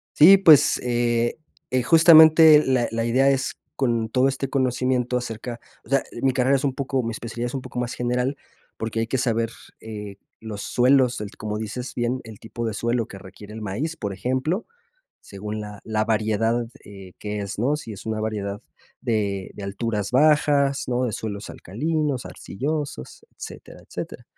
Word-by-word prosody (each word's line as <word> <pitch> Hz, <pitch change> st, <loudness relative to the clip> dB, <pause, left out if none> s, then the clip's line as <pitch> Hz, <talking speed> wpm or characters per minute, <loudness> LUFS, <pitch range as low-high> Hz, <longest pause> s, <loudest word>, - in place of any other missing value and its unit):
Sí, 190 Hz, +6 st, +9 dB
pues, 155 Hz, -6 st, +6 dB
eh 120 Hz, -1 st, 0 dB, 0.4 s
eh, 130 Hz, -, +2 dB
justamente 160 Hz, 0 st, +8 dB
la 130 Hz, -2 st, +2 dB
la 115 Hz, 0 st, -1 dB
idea 130 Hz, +4 st, +3 dB
es 135 Hz, -1 st, 0 dB, 0.2 s
con 115 Hz, -4 st, 0 dB
todo 130 Hz, +3 st, +3 dB
este 135 Hz, 0 st, -2 dB
conocimiento 125 Hz, -1 st, 0 dB
acerca 120 Hz, 0 st, -4 dB, 0.2 s
o -, -, -18 dB
sea, 135 Hz, 0 st, +2 dB, 0.2 s
mi 135 Hz, -1 st, +2 dB
carrera 130 Hz, +2 st, +3 dB
es 135 Hz, -, -3 dB
un 135 Hz, -, 0 dB
poco 135 Hz, -1 st, -1 dB
mi 115 Hz, -1 st, -3 dB
especialidad 115 Hz, +1 st, -5 dB
es 120 Hz, -, -4 dB
un 135 Hz, -, -3 dB
poco 125 Hz, -, -6 dB
más 120 Hz, -1 st, -2 dB
general, 125 Hz, +3 st, -1 dB, 0.4 s
porque 115 Hz, 0 st, -3 dB
hay 115 Hz, -, -1 dB
que 130 Hz, -, -1 dB
saber, 115 Hz, -2 st, 0 dB, 0.3 s
eh, 105 Hz, -3 st, -8 dB, 0.2 s
los 105 Hz, -2 st, -6 dB
suelos, 125 Hz, -1 st, +3 dB
el, 105 Hz, 0 st, -6 dB
como 105 Hz, -1 st, -4 dB
dices 110 Hz, +4 st, -5 dB
bien, 120 Hz, +2 st, -1 dB
el 110 Hz, -2 st, -11 dB
tipo 115 Hz, +1 st, -6 dB
de 110 Hz, -, -2 dB
suelo 120 Hz, +1 st, -1 dB
que 95 Hz, -, -10 dB
requiere 100 Hz, +2 st, -12 dB
el 110 Hz, -, -7 dB
maíz, 125 Hz, +12 st, -3 dB
por 100 Hz, -8 st, -4 dB
ejemplo, 130 Hz, -, -2 dB, 0.6 s
según 105 Hz, +2 st, -6 dB
la 105 Hz, 0 st, -8 dB
la 110 Hz, -1 st, 0 dB
variedad, 115 Hz, +1 st, 0 dB, 0.2 s
eh, 95 Hz, -2 st, -12 dB
que 105 Hz, 0 st, -4 dB
es, 100 Hz, 0 st, -5 dB
¿no? 135 Hz, +6 st, +2 dB
Si 115 Hz, -7 st, -8 dB
es 100 Hz, -, -11 dB
una 110 Hz, -1 st, -2 dB
variedad 105 Hz, -2 st, -3 dB, 0.4 s
de 100 Hz, -4 st, -1 dB
de 100 Hz, -, -9 dB
alturas 105 Hz, +1 st, -3 dB
bajas, 140 Hz, -1 st, +3 dB
¿no? 125 Hz, +1 st, +1 dB
De 115 Hz, -, -3 dB
suelos 105 Hz, -1 st, -5 dB
alcalinos, 150 Hz, -, -2 dB
arcillosos, 145 Hz, -, -5 dB
etcétera, -, -, -10 dB
etcétera. -, -, -7 dB
120 Hz, 175 wpm, -23 LUFS, 110-135 Hz, 0.6 s, Sí